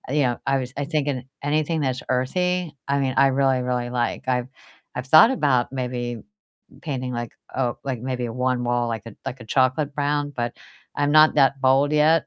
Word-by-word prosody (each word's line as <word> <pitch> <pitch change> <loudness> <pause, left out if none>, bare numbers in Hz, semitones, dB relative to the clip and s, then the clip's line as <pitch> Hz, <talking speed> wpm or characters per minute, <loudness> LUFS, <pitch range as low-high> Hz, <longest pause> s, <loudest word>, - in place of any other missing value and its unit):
you 145 - +3
know, 120 -1 0
I 135 - +3
was 125 +1 -6
I 145 - -1
thinking 145 -4 -2 0.2
anything 155 +2 0
that's 130 -2 -1
earthy, 175 +6 0
I 140 0 +1
mean, 130 -2 0
I 135 - +6
really, 135 -1 +2
really 125 -1 -2
like, 125 +1 -2
I've 125 -1 0 0.5
I've 125 +1 -4
thought 160 - +8
about 135 - +1
maybe 125 -2 -3 0.6
painting 130 -5 -4
like 120 -1 -5 0.2
a 125 -2 0
like, 130 -4 -3
maybe 125 -2 -3
one 125 +1 -1
wall, 120 0 0
like 115 -3 -4
a 110 - -11
like, 130 - -5
a - - -10
chocolate 135 +4 +1
brown, 145 0 -1
but 120 -1 -2 0.4
I'm 145 0 +1
not 155 +1 +6
that 135 -1 +3
bold 135 +2 +3
yet, 155 +2 +4
130 Hz, 190 wpm, -23 LUFS, 125-145 Hz, 0.6 s, thought